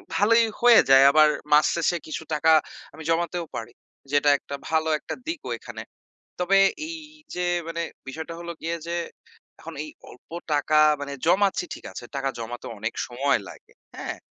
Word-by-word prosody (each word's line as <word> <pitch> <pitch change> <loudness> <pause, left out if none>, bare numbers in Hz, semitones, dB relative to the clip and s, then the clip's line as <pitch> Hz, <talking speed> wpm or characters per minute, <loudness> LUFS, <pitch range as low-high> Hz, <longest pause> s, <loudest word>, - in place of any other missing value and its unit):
ভালোই 230 +3 +5 0.2
হয়ে 240 -1 +8
যায়। 135 0 +8
আবার 155 +1 +6 0.2
মাস 150 0 +6
শেষে 170 +1 +1
কিছু 155 - -5
টাকা 155 +1 +3 0.4
আমি 160 +2 -10
জমাতেও 170 +1 0
পারি 115 +1 -5 0.4
যেটা 145 0 +4
একটা 140 - -7
ভালো 160 0 +1
একটা - - -6
দিকও 330 -1 -4
এখানে। - - -9 0.6
তবে 185 +2 +3 0.3
এইযে 310 - -9 0.3
মানে 165 0 -4 0.3
বিষয়টা 160 +4 -6
হলো 170 0 -5
গিয়ে 165 +1 -2
যে 170 - -3 0.7
এখন 165 0 -9
এই 155 - -9 0.2
অল্প 125 - -18 0.2
টাকা 150 +1 +2 0.2
মানে 140 0 -5
জমাচ্ছি 195 +2 +3
ঠিক - - -13
আছে। - - -8
টাকা 135 0 -1
জমাতে 120 +1 -6
অনেক 110 +2 -3
সময় 135 +2 +1
লাগে। - - -14 0.2
হ্যাঁ? - - -5
160 Hz, 160 wpm, -25 LUFS, 140-180 Hz, 0.7 s, হয়ে